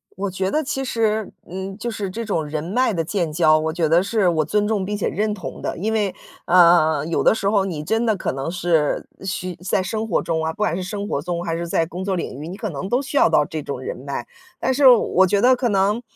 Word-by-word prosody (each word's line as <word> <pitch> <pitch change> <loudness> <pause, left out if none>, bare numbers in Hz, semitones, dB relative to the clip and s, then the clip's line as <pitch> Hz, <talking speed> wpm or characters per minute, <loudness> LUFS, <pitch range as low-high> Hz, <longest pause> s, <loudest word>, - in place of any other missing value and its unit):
我 200 +2 -3
觉 190 +1 -1
得 310 +6 0
其 270 -1 -3
实， 220 -4 0
嗯， 190 +2 -6
就 235 +2 -4
是 205 -3 -4
这 230 +5 -5
种 165 -7 -1
人 150 0 -4
脉 225 +6 +1
的 165 - 0
建 170 -2 -2
交， 155 -1 +4
我 160 0 -2
觉 165 -2 +1
得 165 +3 +4
是 200 0 +1
我 155 -3 +1
尊 210 +5 +1
重 210 -3 0
并 205 +1 -3
且 - - -1
认 210 +1 -1
同 195 - -7
的， - - -3
因 220 +5 -1
为， 205 -4 0 0.3
呃， 170 -4 +5
有 165 - 0
的 - - +5
时 200 -2 0
候 200 -2 +2
你 160 -6 -4
真 225 +8 0
的 220 - +2
可 - - -2
能 135 +4 -4
是 170 -4 0
需 185 -2 -4
在 185 +2 0
生 220 +4 -3
活 190 - +1
中 160 -1 -1
啊， 160 - -1
不 - - -22
管 210 -6 0
是 185 - -3
生 205 +1 -4
活 140 - -2
中， 175 0 -3
还 165 -1 -1
是 170 0 -4
在 165 0 +1
工 180 +3 -6
作 195 -1 -1
领 155 -6 -4
域， 155 - -6
你 185 +3 -7
可 215 -3 -3
能 180 +7 -5
都 245 +4 +2
需 285 +1 -3
要 - - +5
到 150 - +3
这 155 0 -5
种 140 -2 -5
人 130 - -5
脉。 140 +2 -5 0.3
但 260 - +1
是 275 0 +5
我 200 -6 +5
觉 200 +2 +2
得 255 +2 +6
可 245 -1 0
能 200 +3 +1
190 Hz, 285 characters per minute, -21 LUFS, 165-215 Hz, 0.3 s, 得